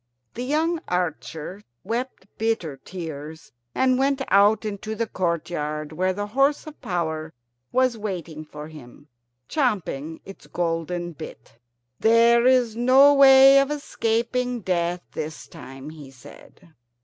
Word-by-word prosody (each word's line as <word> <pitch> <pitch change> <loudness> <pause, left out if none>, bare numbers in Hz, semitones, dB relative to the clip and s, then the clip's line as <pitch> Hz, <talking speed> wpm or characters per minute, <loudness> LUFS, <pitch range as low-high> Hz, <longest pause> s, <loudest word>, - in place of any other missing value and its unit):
The 245 - -5
young 320 +5 0
archer 175 +1 -3 0.2
wept 235 0 -4
bitter 220 -10 -1
tears, 160 -1 -8 0.2
and 255 -1 +2
went 275 0 +1
out 205 +3 +4
into 215 +1 -4
the 230 +1 -1
courtyard, 160 -5 -3
where 185 +4 0
the 205 +2 -3
horse 275 +7 +1
of 310 -1 -12
power 160 - -3 0.4
was 255 -3 +1
waiting 170 -7 -5
for 150 0 -10
him, 145 -1 -14 0.4
champing 175 - -2
its 195 - -12
golden 175 0 -2
bit. 155 -6 -11 0.4
"There 235 +2 +5
is 250 -4 +3
no 260 +4 +6
way 270 0 +8
of 275 0 +1
escaping 245 -3 -1
death 175 -1 -1
this 155 0 -6
time," 135 -1 -10
he 150 -4 -12
said. 135 +5 -16
190 Hz, 125 wpm, -24 LUFS, 160-250 Hz, 0.4 s, way